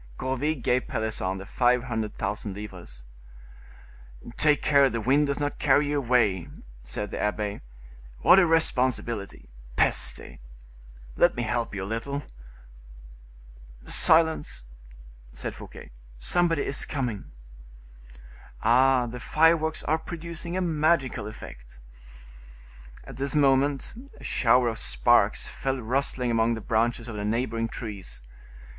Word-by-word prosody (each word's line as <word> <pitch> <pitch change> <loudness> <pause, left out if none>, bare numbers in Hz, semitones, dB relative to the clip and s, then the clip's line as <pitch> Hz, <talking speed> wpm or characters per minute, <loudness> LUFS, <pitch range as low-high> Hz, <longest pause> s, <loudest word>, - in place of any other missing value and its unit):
Gourville 135 +4 -1
gave 125 -1 0
Pelisson 105 -4 -2
the 95 - -8
five 125 +3 +2
hundred 110 -4 -4
thousand 105 -2 -4
livres. 90 -12 -10 1.3
"Take 150 -1 +2
care 140 -2 +5
the 115 - -3
wind 140 +6 +2
does 140 0 -2
not 145 0 -3
carry 145 +1 +3
you 145 0 0
away," 115 -9 +1 0.3
said 80 +13 -5
the - - -4
abbe; 105 -1 -2 0.6
"what 190 - +7
a 175 - +4
responsibility. 125 -9 0 0.3
Peste! - - 0 0.8
Let - - +4
me 120 - -2
help 115 0 -2
you 95 - -4
a - - -4
little." 115 +7 -4 1.6
"Silence!" 160 - +3 0.7
said - - -5
Fouquet, - - -12 0.3
"somebody 165 - +1
is 140 - -2
coming. 125 -8 -3 1.4
Ah! 125 +2 +4
the 120 +1 -7
fireworks 160 +3 +2
are 160 +2 0
producing 170 +1 -6
a - - 0
magical 155 - +1
effect." - - -11 1.3
At 135 -3 -11
this 140 +2 -2
moment 140 -1 +2 0.3
a - - -13
shower 125 0 +3
of 110 -2 -3
sparks - - +2
fell 135 -1 -3
rustling 125 +1 -1
among 115 0 +2
the - - -6
branches 115 +2 0
of 115 - -7
the 105 - -3
neighboring 115 +1 -1
trees. 100 - -7
125 Hz, 125 wpm, -26 LUFS, 110-145 Hz, 1.6 s, what